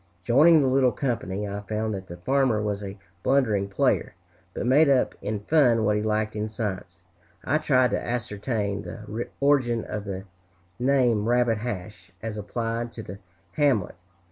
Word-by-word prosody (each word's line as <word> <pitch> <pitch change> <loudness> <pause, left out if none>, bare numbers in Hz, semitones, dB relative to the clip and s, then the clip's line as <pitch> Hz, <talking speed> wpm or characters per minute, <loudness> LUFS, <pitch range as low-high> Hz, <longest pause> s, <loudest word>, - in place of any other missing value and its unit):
Joining 150 - +6
the - - +2
little 130 -1 +3
company, 105 -7 -2
I 100 0 -4
found 110 +1 -2
that 95 -1 -6
the 85 - -9
farmer 130 +2 +1
was 105 -1 -2
a 100 0 -7 0.2
blundering 110 -7 +1
player, 95 - 0 0.4
but - - -4
made 140 +4 +5
up 135 -2 +3
in 105 -1 -3
fun 120 -4 +3
what 105 0 +2
he 105 - 0
lacked 110 0 -1
in 105 0 -2
science. 95 -6 -5 0.4
I 155 - +1
tried 130 -6 +3
to - - -1
ascertain 105 -3 -2
the 110 +2 -6
origin 130 -5 +2
of 105 -1 -5
the 95 -1 -5 0.6
name 120 -4 +2
Rabbit 120 -2 +2
Hash, 105 -3 -6
as 110 -1 -5
applied 115 +3 -3
to 110 - -7
the 100 0 -9 0.3
hamlet. 130 -6 +1
110 Hz, 165 wpm, -25 LUFS, 105-125 Hz, 0.6 s, Joining